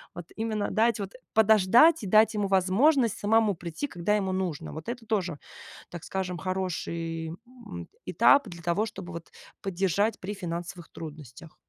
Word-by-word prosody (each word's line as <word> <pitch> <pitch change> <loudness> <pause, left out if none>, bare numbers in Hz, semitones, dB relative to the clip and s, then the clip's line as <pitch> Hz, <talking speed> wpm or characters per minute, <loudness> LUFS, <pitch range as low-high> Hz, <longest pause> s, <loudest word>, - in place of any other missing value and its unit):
Вот 175 - -7
именно 215 -2 -2
дать 225 0 +2
вот, 195 -1 -5 0.2
подождать 220 - +5
и - - -4
дать 215 +3 +5
ему 205 -2 -1
возможность 220 - +3
самому 215 -1 +3
прийти, 170 - -5
когда 180 -1 -1
ему 190 -2 -1
нужно. 180 -6 -3
Вот 160 +5 -7
это 240 -1 -6
тоже, 185 -8 -2 0.5
так 175 -2 -8
скажем, 185 -2 -3
хороший, 170 -3 -3 0.2
м, 240 -5 -10 0.2
этап 280 -4 +4
для 170 -1 -10
того, 185 +6 0
чтобы 190 -4 -8
вот 170 0 -8 0.3
поддержать 195 +3 0
при 205 +3 -5
финансовых 175 -1 -6
трудностях. 155 -1 -10
190 Hz, 155 wpm, -27 LUFS, 170-220 Hz, 0.5 s, подождать